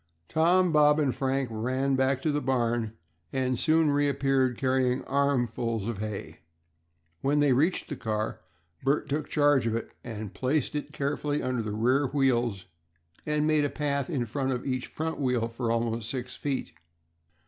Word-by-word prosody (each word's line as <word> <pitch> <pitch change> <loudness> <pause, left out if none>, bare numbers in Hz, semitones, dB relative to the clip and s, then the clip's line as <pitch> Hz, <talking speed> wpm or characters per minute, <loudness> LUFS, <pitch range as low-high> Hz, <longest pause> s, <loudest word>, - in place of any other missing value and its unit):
Tom, 175 +3 +3
Bob, 150 0 +5
and 140 -4 +2
Frank 135 0 0
ran 130 +5 0
back 130 0 +1
to 155 - +2
the 145 0 0
barn 120 -4 0 0.4
and 130 -2 0
soon 160 -1 +3
reappeared, 135 -3 +2
carrying 130 -1 +1
armfuls 120 -6 0
of 115 -4 -3
hay. 105 -2 -5 0.8
When 145 +2 +2
they 145 -2 +4
reached 160 +9 +1
the 145 - -4
car 110 -3 -3 0.4
Bert 140 +3 +1
took 150 +1 -2
charge 145 -5 +3
of 115 - 0
it, 115 - -4
and 110 -4 -6
placed 130 +6 0
it 150 - -4
carefully 145 +1 -1
under 130 -2 -1
the 105 -2 -4
rear 130 +6 +2
wheels, 120 -7 +1 0.6
and 150 0 +1
made 155 -1 +3
a 145 - +1
path 140 -3 -1
in 135 -7 -1
front 135 +4 -2
of 125 - -4
each 130 -2 -2
wheel 130 -7 0
for 115 0 -3
about 115 0 0
six 125 +2 -4
feet. 140 -3 -3
130 Hz, 160 wpm, -28 LUFS, 120-145 Hz, 0.8 s, Bob